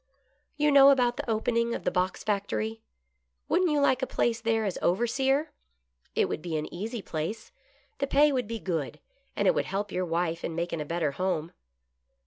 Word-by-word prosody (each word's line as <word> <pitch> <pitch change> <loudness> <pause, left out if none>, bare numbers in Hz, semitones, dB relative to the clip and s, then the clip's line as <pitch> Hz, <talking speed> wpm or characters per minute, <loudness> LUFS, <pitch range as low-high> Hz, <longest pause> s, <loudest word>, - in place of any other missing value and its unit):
"You 300 0 +3
know 280 -1 +8
about 250 -3 +3
the 290 -4 -4
opening 235 +1 +1
of - - -6
the - - 0
box 185 0 -1
factory. 215 +2 -2 0.7
Wouldn't 360 +1 +2
you 300 -1 +2
like 265 -2 +3
a 260 - -1
place 230 -1 0
there 225 -1 +1
as 195 - -2
overseer.^ 265 - +1 0.7
It - - +3
would - - -4
be 165 -2 -3
an 150 - -5
easy 215 +4 -5
place, 170 +9 -4 0.5
the 275 - 0
pay 290 +2 +4
would 250 -5 -1
be 230 +1 -3
good, 170 -8 -3 0.4
and - - +1
it - - +5
would - - 0
help 200 +1 -3
your 185 0 -1
wife 170 0 -1
in 165 - -3
making 170 -1 -2
a - - -4
better 165 -1 -1
home." 170 0 -2
220 Hz, 190 wpm, -28 LUFS, 175-260 Hz, 0.7 s, know